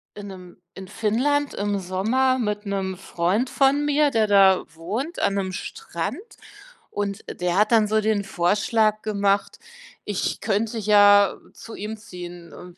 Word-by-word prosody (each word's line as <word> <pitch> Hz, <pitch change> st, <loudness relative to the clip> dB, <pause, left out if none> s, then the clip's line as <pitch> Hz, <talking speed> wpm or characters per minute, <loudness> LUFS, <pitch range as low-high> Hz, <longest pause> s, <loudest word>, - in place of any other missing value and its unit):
in 205 Hz, -1 st, -8 dB
’nem 185 Hz, -2 st, -12 dB, 0.2 s
in 190 Hz, 0 st, -9 dB
Finnland 260 Hz, +8 st, 0 dB
im 205 Hz, 0 st, -1 dB
Sommer 220 Hz, +9 st, 0 dB
mit 210 Hz, -2 st, -2 dB
'nem 195 Hz, -2 st, -3 dB
Freund 190 Hz, +6 st, -1 dB
von 275 Hz, +1 st, +2 dB
mir, 295 Hz, 0 st, +2 dB
der 220 Hz, -3 st, +2 dB
da 195 Hz, -2 st, +5 dB
wohnt 230 Hz, -, -4 dB
an 200 Hz, -, +1 dB
'nem 190 Hz, -1 st, -2 dB
Strand 170 Hz, -, -5 dB, 0.7 s
und 200 Hz, 0 st, -4 dB, 0.2 s
der 180 Hz, -1 st, 0 dB
hat 210 Hz, +2 st, +3 dB
dann 220 Hz, -2 st, +4 dB
so 215 Hz, +1 st, +1 dB
den 215 Hz, -1 st, 0 dB
Vorschlag 210 Hz, +4 st, +1 dB
gemacht, 200 Hz, -2 st, 0 dB, 0.5 s
ich 205 Hz, -3 st, -3 dB
könnte 220 Hz, +2 st, -1 dB
ja 205 Hz, -1 st, +5 dB, 0.2 s
zu 230 Hz, -, -11 dB
ihm 215 Hz, +2 st, -6 dB
ziehen 175 Hz, -5 st, -10 dB
und 180 Hz, 0 st, -12 dB
205 Hz, 150 wpm, -23 LUFS, 190-220 Hz, 0.7 s, da